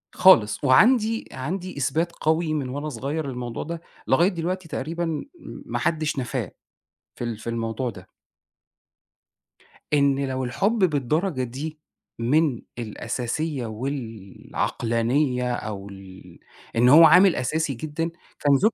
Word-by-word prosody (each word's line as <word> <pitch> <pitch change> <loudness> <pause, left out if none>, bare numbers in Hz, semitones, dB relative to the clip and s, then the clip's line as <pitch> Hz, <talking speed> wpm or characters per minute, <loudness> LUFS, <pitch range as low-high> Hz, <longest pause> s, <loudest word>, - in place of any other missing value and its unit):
خالص، 110 - +5
وعَندي 220 - +4
عَندي 180 +6 -5
إثبات 155 +5 0
قوي 160 0 0
من 140 -4 -2
وأنا 145 +4 -4
صغير 140 +4 -3
للموضوع 125 -3 -4
ده، 165 +1 -6 0.3
لغاية 170 +8 +4
دلوقتي 180 0 -3
تقريبًا 165 +4 -3
م 160 -3 -2 0.4
ما - - -3
حدش 155 -3 0
نفاه 125 -2 -3 0.6
في - - -6
ال 120 -2 -3
في 115 - -6
الموضوع 115 +2 -2
ده. 95 -4 -11 1.9
إن 140 -1 +3
لو 130 0 -2
الحُب 195 - 0
بالدرجة 155 - +1
دي 145 +6 -6 0.4
من 135 +1 +2 0.2
الأساسية 120 +5 -3
والعقلانية 120 +2 -2
أو 100 -4 -5
ال 95 -2 -13 0.4
إن 120 +2 +5
هو 155 +5 +9
عامل 180 +3 +7
أساسي 150 +4 -1
جدًا 155 +5 -3 0.3
كان 145 -1 +4
ذُك 215 +11 +3
140 Hz, 125 wpm, -24 LUFS, 120-160 Hz, 1.9 s, هو